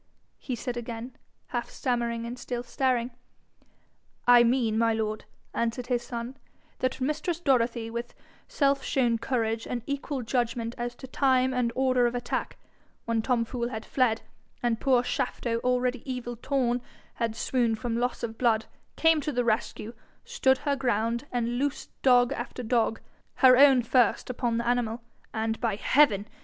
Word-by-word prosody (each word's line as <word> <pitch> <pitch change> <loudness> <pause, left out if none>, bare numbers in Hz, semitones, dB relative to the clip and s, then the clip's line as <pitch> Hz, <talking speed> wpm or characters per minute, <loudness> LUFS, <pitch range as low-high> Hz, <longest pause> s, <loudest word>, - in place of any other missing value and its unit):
he 255 - -4
said 240 +1 -4
again, 235 +1 -6 0.3
half 240 -2 -3
stammering, 235 -2 -2
and 240 +1 -6
still 245 -1 -4
staring. 250 -1 0 1.1
'I 245 -1 +8
mean, 235 -2 +2
my 230 0 +3
lord,' 215 -1 -2 0.3
answered 235 +1 -1
his 245 -1 0
son, 240 +1 -6 0.4
'that 255 0 -1
mistress 305 +5 -1
Dorothy, 235 -6 +1
with 235 +1 -5 0.3
self 275 -1 +1
shown 240 -4 +1
courage, 230 -2 -1
and 240 -2 -3
equal 280 -1 -3
judgment 230 -1 -1
as 240 0 -4
to - - -10
time 260 -1 +2
and 245 -2 +1
order 255 -2 +3
of 240 - -3
attack, 245 - -3 0.5
when 230 -1 +1
Tom 235 0 +1
Fool 235 0 -3
had 220 -3 -6
fled, 240 -4 +1 0.4
and 235 -2 0
poor 255 -3 +3
Shafto, 235 -2 -1
already 250 0 0
evil 240 -1 -4
torn, 245 0 0 0.4
had 230 -1 0
swooned 235 -2 0
from 230 +1 -3
loss 245 +2 -1
of 225 -1 -4
blood, 225 -3 +2 0.3
came 325 -1 +4
to 300 - -2
the 245 -2 0
rescue, 225 0 -1 0.3
stood 370 - +2
her 280 +1 -1
ground, 235 0 -1
and 240 0 -1
loosed 285 0 -2
dog 245 0 +5
after 250 - -5
dog, 225 -1 +1 0.4
her 255 -2 +7
own 265 -2 +6
first, 245 +1 +2
upon 235 -1 -1
the 235 0 -2
animal. 240 -1 0 0.3
And, 225 0 -2
by 225 -4 +1
heaven! 210 -3 +3
245 Hz, 160 wpm, -27 LUFS, 230-255 Hz, 1.1 s, I